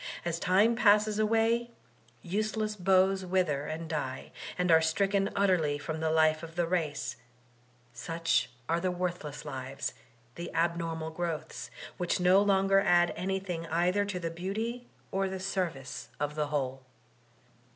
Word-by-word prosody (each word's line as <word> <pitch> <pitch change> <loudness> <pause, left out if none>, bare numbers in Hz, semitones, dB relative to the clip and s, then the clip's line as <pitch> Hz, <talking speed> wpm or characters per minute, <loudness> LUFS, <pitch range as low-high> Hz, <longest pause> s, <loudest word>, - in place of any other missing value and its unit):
As 170 -1 -1
time 205 +7 +4
passes 210 -1 +4
away 225 +2 +2 0.5
useless 215 +3 -1
boughs 190 0 +3
wither 175 -6 0
and 160 +1 -4
die, 145 -5 -4 0.3
and 180 -1 +2
are 160 0 +7
stricken 195 +5 +1
utterly 180 -7 +2
from 155 +2 -4
the 160 0 0
life 155 0 +3
of 165 0 -9
the 175 -1 +1
race; 145 -8 -2 0.8
such 165 +7 0 0.2
are 165 +1 +1
the 185 +1 0
worthless 175 -5 -4
lives, 130 +1 -4 0.4
the 170 +4 -6
abnormal 165 -1 -1
growths, 165 -1 -4 0.3
which 180 0 0
no 180 +2 +5
longer 195 -1 +4
add 175 -3 +4
anything 185 -2 -3
eitfier 180 +5 +1
to 195 -3 -3
the 165 -2 -3
beauty 220 +8 -4 0.2
or 195 0 0
die 190 0 -4
service 185 -8 -3
of 150 0 -1
the 150 -1 -1
whole. 135 -3 -2
175 Hz, 140 wpm, -30 LUFS, 160-195 Hz, 0.8 s, are